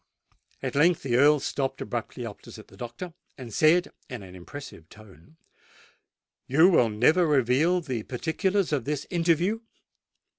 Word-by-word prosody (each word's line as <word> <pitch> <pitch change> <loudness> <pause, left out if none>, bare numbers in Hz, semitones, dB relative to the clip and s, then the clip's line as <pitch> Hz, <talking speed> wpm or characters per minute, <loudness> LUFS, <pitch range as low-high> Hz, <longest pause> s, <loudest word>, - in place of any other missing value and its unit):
At - - -3
length 165 +4 +3
the 125 -4 0
Earl 145 +3 +5
stopped 135 0 -3
abruptly - - -5
opposite - - -11
the - - -16
doctor, 120 +9 -7 0.2
and 125 -5 -9
said 165 - +3 0.2
in 125 -5 -7
an 90 -1 -12
impressive 90 - -11
tone, 105 - -17 1.1
"You 160 +8 +5
will 125 -11 +4
never 155 +12 +3
reveal 150 +6 +2
the 130 -8 -4
particulars 170 - -1
of 135 -5 -1
this 150 -1 -3
interview?" 175 +4 +1
145 Hz, 140 wpm, -26 LUFS, 120-170 Hz, 1.1 s, Earl